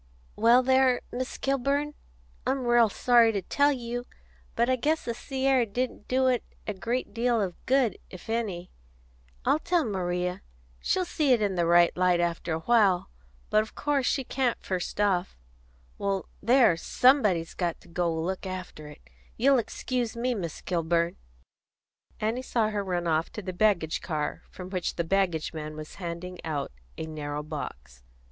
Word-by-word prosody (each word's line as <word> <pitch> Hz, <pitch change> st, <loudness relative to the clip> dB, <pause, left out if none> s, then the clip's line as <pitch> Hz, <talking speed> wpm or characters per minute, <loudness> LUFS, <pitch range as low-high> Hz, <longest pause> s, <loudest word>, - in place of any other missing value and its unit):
"Well, 235 Hz, +3 st, +5 dB
there, 260 Hz, -1 st, +4 dB
Miss 255 Hz, +1 st, -4 dB
Kilburn, 275 Hz, +2 st, 0 dB, 0.5 s
I'm 265 Hz, -1 st, 0 dB
ril 240 Hz, -2 st, +5 dB
sorry 235 Hz, +1 st, +4 dB
to 200 Hz, -2 st, -2 dB
tell 285 Hz, +9 st, +3 dB
you, 245 Hz, -2 st, -4 dB, 0.5 s
but 235 Hz, +1 st, +2 dB
I 255 Hz, -, +3 dB
guess 305 Hz, +5 st, 0 dB
the 235 Hz, -, -1 dB
sea 265 Hz, +3 st, -4 dB
air 265 Hz, -2 st, +4 dB
didn't 235 Hz, 0 st, -3 dB
do 260 Hz, +1 st, +2 dB
it 255 Hz, -2 st, +2 dB, 0.2 s
a 210 Hz, -, -2 dB
great 235 Hz, +6 st, -3 dB
deal 235 Hz, 0 st, +1 dB
of 190 Hz, -4 st, -3 dB
good, 255 Hz, -6 st, +2 dB
if 185 Hz, -, -11 dB
any. 210 Hz, -6 st, -3 dB, 0.7 s
I 305 Hz, -, +3 dB
tell 345 Hz, -1 st, +1 dB
Maria 180 Hz, -3 st, -2 dB, 0.4 s
she'll 370 Hz, -, 0 dB
see 300 Hz, -6 st, +2 dB
it 240 Hz, -, +3 dB
in 200 Hz, -2 st, +1 dB
the 175 Hz, -2 st, +1 dB
right 170 Hz, 0 st, +5 dB
light 180 Hz, -1 st, +3 dB
after 170 Hz, 0 st, -1 dB
a 160 Hz, 0 st, -1 dB
while, 200 Hz, -, +3 dB, 0.4 s
but 215 Hz, -, +5 dB
of 220 Hz, -, -8 dB
course 285 Hz, -3 st, 0 dB
she 270 Hz, -, +1 dB
can't, 250 Hz, -1 st, 0 dB
first 185 Hz, +1 st, -3 dB
off. 190 Hz, -3 st, +1 dB, 0.6 s
Well, 195 Hz, -1 st, -1 dB, 0.2 s
there! 240 Hz, -4 st, +5 dB
Somebody's 210 Hz, -, +3 dB
got 175 Hz, -2 st, -2 dB
to -, -, -18 dB, 0.2 s
look 170 Hz, +4 st, -2 dB
after 185 Hz, -5 st, -7 dB
it. 150 Hz, -, -13 dB, 0.4 s
You'll 270 Hz, +2 st, +4 dB
excuse 240 Hz, 0 st, -3 dB
me, 250 Hz, +2 st, 0 dB
Miss 175 Hz, -8 st, -5 dB
Kilburn." 170 Hz, -1 st, 0 dB, 1.0 s
Annie 225 Hz, +4 st, -1 dB
saw 230 Hz, -4 st, 0 dB
her 205 Hz, -1 st, -1 dB
run 175 Hz, -2 st, -2 dB
off 160 Hz, 0 st, +1 dB
to 210 Hz, -, -6 dB
the 185 Hz, 0 st, -4 dB
baggage 175 Hz, -5 st, +1 dB
car, 155 Hz, -4 st, -3 dB
from 185 Hz, 0 st, -9 dB
which 185 Hz, -3 st, -2 dB
the 170 Hz, -, 0 dB
baggage 175 Hz, -3 st, 0 dB
man 155 Hz, -1 st, -6 dB
was 155 Hz, 0 st, -8 dB
handing 175 Hz, +1 st, -6 dB
out 150 Hz, -3 st, -3 dB, 0.3 s
a -, -, -4 dB
narrow 150 Hz, -1 st, -5 dB
box. 65 Hz, -, -7 dB
205 Hz, 165 wpm, -27 LUFS, 175-250 Hz, 1.0 s, Well